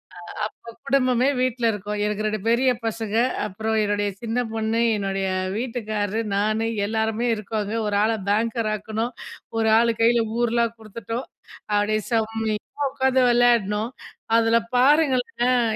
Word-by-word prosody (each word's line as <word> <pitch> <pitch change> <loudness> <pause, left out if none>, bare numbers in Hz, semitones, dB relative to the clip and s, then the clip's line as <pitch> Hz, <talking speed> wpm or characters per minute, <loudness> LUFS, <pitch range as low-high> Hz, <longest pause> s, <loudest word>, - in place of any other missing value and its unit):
அ, - - -13 0.3
அப்ப 230 0 -13
குடும்பமே 255 -1 +2
வீட்ல 255 -2 0
இருக்கும், 210 0 -4
எனக்கு 210 0 -2
2 215 0 -1
பெரிய 250 +3 +3 0.2
பசங்க, 220 -1 -3 0.3
அப்புறம் 220 +2 -2
என்னுடைய 205 0 0
சின்ன 230 +1 -2
பொண்ணு, 225 +1 0 0.2
என்னுடைய 195 -1 -2 0.3
வீட்டுக்காரர் 220 -2 -2
நானு, 215 +2 +1 0.2
எல்லாருமே 220 +2 -1
இருக்கோங்க, 210 0 -3
ஒரு 205 -1 0
ஆள 220 - +2 0.2
பேங்கர் 225 +1 +1
ஆக்கணும். 220 +3 -3 0.4
ஒரு 220 0 +2
ஆள் 235 0 +3
கையில 235 +1 +4 0.2
ஊர்லாம் 235 -1 +1
குடுத்துட்டோம். 230 +3 -6 0.5
அப்டியே 210 +1 +2
செம்மையா 225 +3 -2
உக்காந்து 265 -1 +2
விளயாடணும். 235 -3 +3 0.5
அதுல 230 0 +3 0.2
பாருங்களேன், 255 -3 +3
225 Hz, 125 wpm, -23 LUFS, 215-240 Hz, 0.5 s, கையில